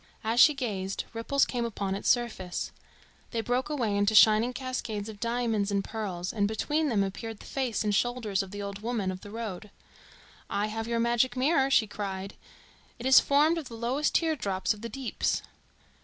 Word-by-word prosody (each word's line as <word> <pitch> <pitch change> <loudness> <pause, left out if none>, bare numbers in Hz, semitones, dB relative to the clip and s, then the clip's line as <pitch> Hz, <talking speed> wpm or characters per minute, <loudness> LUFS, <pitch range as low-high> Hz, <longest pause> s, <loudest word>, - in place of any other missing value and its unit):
As 225 +2 0
she 300 +3 +8
gazed, 200 -7 -3
ripples 250 +5 +1
came 245 -2 -2
upon 200 -4 -2
its 195 - -1
surface. 215 -7 0 0.6
They 230 - -3
broke 250 +4 -1
away 240 -9 0
into 205 +2 +2
shining 220 +3 +6
cascades 245 -5 -4
of 210 -2 -9
diamonds 230 -3 0
and 200 -1 0
pearls, 190 -6 -4
and 205 -2 +1
between 295 +8 0
them 210 -5 +2
appeared 220 +3 -5
the - - -13
face 255 -6 -1
and 210 -1 0
shoulders 225 -2 0
of 195 - -7
the 205 +1 -6
old 200 0 -5
woman 220 -4 -1
of 185 0 -7
the 205 - -10
road. 215 -2 -6 0.8
"I 205 +1 0
have 225 0 -3
your 235 0 0
magic 240 +2 +2
mirror," 270 0 +3
she 240 -4 +4
cried. 195 -2 -5 0.6
"It 240 - -8
is 265 0 +8
formed 305 +4 +3
of 300 - -7
the 230 - -8
lowest 255 +6 0
teardrops 225 - +1
of 210 - -13
the 230 - -5
Deeps." 260 +1 -2
225 Hz, 185 wpm, -28 LUFS, 205-250 Hz, 0.8 s, she